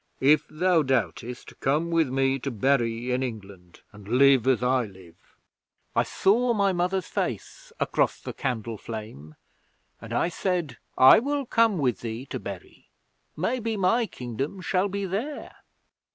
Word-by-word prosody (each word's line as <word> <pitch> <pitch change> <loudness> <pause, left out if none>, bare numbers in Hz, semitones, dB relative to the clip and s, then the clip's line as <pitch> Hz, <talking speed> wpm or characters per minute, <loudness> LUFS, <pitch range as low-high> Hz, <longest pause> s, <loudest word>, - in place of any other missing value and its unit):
If 145 +3 +4
thou 170 +1 +2
doubtest, 125 -2 -2
come 155 +5 0
with 165 -4 +2
me 135 +1 +1
to 140 - -3
Bury 120 -1 0
in 125 +1 0
England 100 -8 -8
and 105 -1 -14
live 130 +1 +4
as 125 -3 +2
I 125 -1 +2
live." 95 -4 -17 0.6
'I - - +4
saw 235 +5 +2
my 200 -2 +2
mother's 180 +2 0
face - - -4
across - - 0
the - - -7
candle 115 -5 -3
flame, 105 -10 -8 0.7
and - - -10
I - - +1
said, 175 -4 -2 0.2
"I 130 - +8
will 280 +3 -2
come 230 -4 +2
with 130 -6 0
thee 115 +2 -5
to - - -3
Bury. - - -10 0.5
Maybe 225 +5 -1
my 220 +5 +2
Kingdom 130 - -5
shall 185 +1 0
be 200 0 -3
there." 230 +11 -4
135 Hz, 150 wpm, -26 LUFS, 120-190 Hz, 0.7 s, I